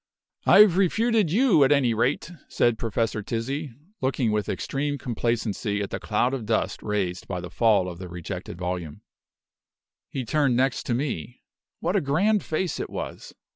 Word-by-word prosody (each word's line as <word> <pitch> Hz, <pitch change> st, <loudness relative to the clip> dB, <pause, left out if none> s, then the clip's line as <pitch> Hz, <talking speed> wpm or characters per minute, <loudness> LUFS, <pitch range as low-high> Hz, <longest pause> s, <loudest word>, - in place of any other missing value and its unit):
"I've 195 Hz, -3 st, +7 dB
refuted 215 Hz, 0 st, +2 dB
you, 220 Hz, -, +5 dB
at 135 Hz, -, +3 dB
any 135 Hz, -5 st, +3 dB
rate!" 125 Hz, +9 st, 0 dB, 0.2 s
said 120 Hz, -2 st, +1 dB
Professor 115 Hz, -1 st, -1 dB
Tizzi, 135 Hz, +8 st, -3 dB, 0.3 s
looking 130 Hz, -3 st, +1 dB
with 105 Hz, -1 st, -1 dB
extreme 145 Hz, +1 st, -2 dB
complacency 115 Hz, -4 st, -1 dB
at 100 Hz, -, -3 dB
the -, -, -3 dB
cloud 120 Hz, +4 st, 0 dB
of 120 Hz, -6 st, -4 dB
dust 110 Hz, 0 st, 0 dB
raised 95 Hz, -4 st, -2 dB
by 90 Hz, -2 st, -3 dB
the 90 Hz, 0 st, -8 dB
fall 105 Hz, -5 st, +3 dB
of 85 Hz, -1 st, -7 dB
the 90 Hz, -1 st, -7 dB
rejected 85 Hz, -1 st, -6 dB
volume. 90 Hz, -4 st, -4 dB, 1.1 s
He 130 Hz, -2 st, -4 dB
turned 135 Hz, -1 st, +2 dB
next 130 Hz, 0 st, +1 dB
to 120 Hz, -, +1 dB
me. 125 Hz, -, -4 dB, 0.4 s
What 175 Hz, +4 st, 0 dB
a 200 Hz, -, +3 dB
grand 190 Hz, +10 st, +2 dB
face 170 Hz, +3 st, -2 dB
it -, -, -4 dB
was! -, -, -7 dB
120 Hz, 165 wpm, -25 LUFS, 105-150 Hz, 1.1 s, I've